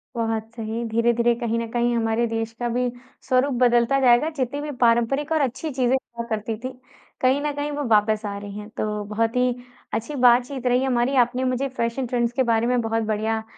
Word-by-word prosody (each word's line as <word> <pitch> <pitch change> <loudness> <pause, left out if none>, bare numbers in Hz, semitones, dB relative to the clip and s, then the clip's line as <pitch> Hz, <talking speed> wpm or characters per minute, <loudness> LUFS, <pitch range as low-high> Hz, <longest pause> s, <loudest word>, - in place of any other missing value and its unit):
बहुत 225 -1 -2
सही। 225 +1 -4
धीरे-धीरे 235 +1 +2
कहीं 230 -1 -1
न 230 - -3
कहीं 240 0 +1
हमारे 225 +1 +1
देश 225 0 -3
का 240 - -1
भी 245 +1 0 0.4
स्वरूप 260 +1 +2
बदलता 240 +2 +4
जाएगा। 250 +4 +4
जितनी 285 -1 -3
भी 295 0 -4
पारंपरिक 240 +6 +2
और 315 -2 +2
अच्छी 270 +4 -2
चीज़ें 255 0 +2
हुआ 235 -3 -5
करती 220 0 -2
थीं। 255 0 -4 0.5
कहीं 260 +2 +3
न 295 - -1
कहीं 290 +1 -3
वो 290 0 -3
वापस 215 0 +3
आ 200 -1 -4
रही 200 0 -8
हैं। 210 +1 -9
तो 210 -1 -2
बहुत 225 +3 -1
ही 250 -1 +2 0.4
अच्छी 230 +7 -3
बातचीत 250 +2 +3
रही 250 +1 +3
हमारी। 255 +1 +1
आपने 250 +2 -4
मुझे 255 +2 0
फैशन 235 +3 -1
ट्रेंड्स 240 -1 0
के 260 0 +2
बारे 225 +1 +2
में 250 0 +2
बहुत 225 0 -1
बढ़िया 220 +1 -1
240 Hz, 205 wpm, -23 LUFS, 225-255 Hz, 0.5 s, बदलता